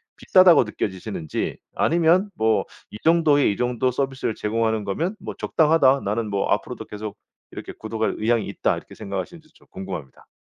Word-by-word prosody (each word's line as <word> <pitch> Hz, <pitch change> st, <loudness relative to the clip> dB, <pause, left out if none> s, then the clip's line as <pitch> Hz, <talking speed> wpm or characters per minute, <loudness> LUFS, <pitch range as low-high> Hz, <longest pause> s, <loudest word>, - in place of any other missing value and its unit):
비싸다고 185 Hz, -5 st, +6 dB
느껴지시는지 100 Hz, -6 st, -4 dB, 0.2 s
아니면 170 Hz, +4 st, +3 dB
뭐 110 Hz, 0 st, +1 dB, 0.3 s
'이 105 Hz, -, -8 dB
정도의 160 Hz, -6 st, +4 dB
이 100 Hz, -, -4 dB
정도 125 Hz, +1 st, 0 dB
서비스를 135 Hz, -2 st, -2 dB
제공하는 110 Hz, 0 st, -1 dB
거면 165 Hz, -, -2 dB
뭐 -, -, -6 dB
적당하다. 150 Hz, -4 st, +3 dB
나는 105 Hz, +2 st, -1 dB
뭐 100 Hz, -1 st, -1 dB
앞으로도 -, -, -2 dB
계속 105 Hz, 0 st, -7 dB, 0.3 s
이렇게 -, -, -8 dB
구독할 110 Hz, 0 st, -3 dB
의향이 115 Hz, 0 st, +1 dB
있다.' -, -, 0 dB
이렇게 -, -, -11 dB
생각하시는지도 110 Hz, -, -7 dB
좀 -, -, -23 dB
궁금합니다. 80 Hz, -8 st, -8 dB
115 Hz, 415 characters per minute, -23 LUFS, 105-155 Hz, 0.3 s, 비싸다고